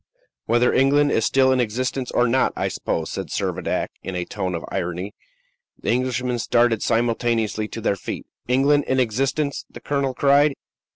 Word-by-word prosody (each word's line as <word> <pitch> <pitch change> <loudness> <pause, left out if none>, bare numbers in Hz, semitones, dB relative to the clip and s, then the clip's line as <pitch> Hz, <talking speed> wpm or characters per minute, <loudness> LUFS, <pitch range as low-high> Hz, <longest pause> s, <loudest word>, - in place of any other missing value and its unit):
"Whether 120 +1 +3
England 145 +2 +4
is 110 - +2
still 130 -1 +4
in 130 - +2
existence 125 +2 -1
or 125 - +2
not, 130 +3 +2
I - - -1
suppose," 80 - -3
said - - -4
Servadac, - - -2
in 95 - -5
a 90 -1 -2
tone 95 -2 -3
of 85 - -5
irony. 90 +3 -3 0.7
The - - -1
Englishmen 125 0 0
started 120 -1 +2
simultaneously 115 -2 0
to 115 - -7
their 100 - +1
feet. 95 - -6 0.2
"England 140 +3 +3
in 130 - +1
existence?" 135 +5 0
the - - -11
colonel 140 -2 -1
cried. 140 +1 +4
125 Hz, 165 wpm, -22 LUFS, 110-135 Hz, 0.7 s, England